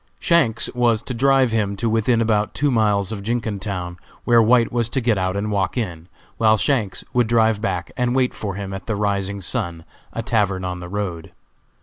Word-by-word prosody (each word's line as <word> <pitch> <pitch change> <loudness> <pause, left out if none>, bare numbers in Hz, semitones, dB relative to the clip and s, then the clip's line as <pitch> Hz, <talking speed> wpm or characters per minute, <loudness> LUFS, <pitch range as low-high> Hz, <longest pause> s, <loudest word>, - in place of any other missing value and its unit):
Shanks 145 -10 +2
was 120 -2 +2
to 125 - -5
drive 135 0 +3
him 105 -3 0
to 115 +3 -2
within 115 +1 +2
about 105 -2 +1
two 145 0 +1
miles 105 -4 +1
of 105 -2 -5
Jenkintown, 100 -5 -3 0.3
where 120 -1 +5
White 115 +1 +4
was 120 -2 0
to 130 - -1
get 115 -3 +2
out 95 +1 -1
and 105 +1 -2
walk 100 +2 -1
in, 85 -8 -4 0.3
while 110 -1 +4
Shanks 110 -8 0
would 125 -2 +2
drive 110 -2 +2
back 90 -5 -2
and 125 -1 0
wait 130 -1 +2
for 100 -3 -5
him 100 -1 -5
at 95 - -7
the 110 - -1
Rising 100 -1 -1
Sun, 85 -2 -3 0.3
a 115 - -4
tavern 100 -6 0
on 90 -1 -4
the 85 0 -8
road. 90 -5 -4
110 Hz, 200 wpm, -21 LUFS, 100-120 Hz, 0.3 s, where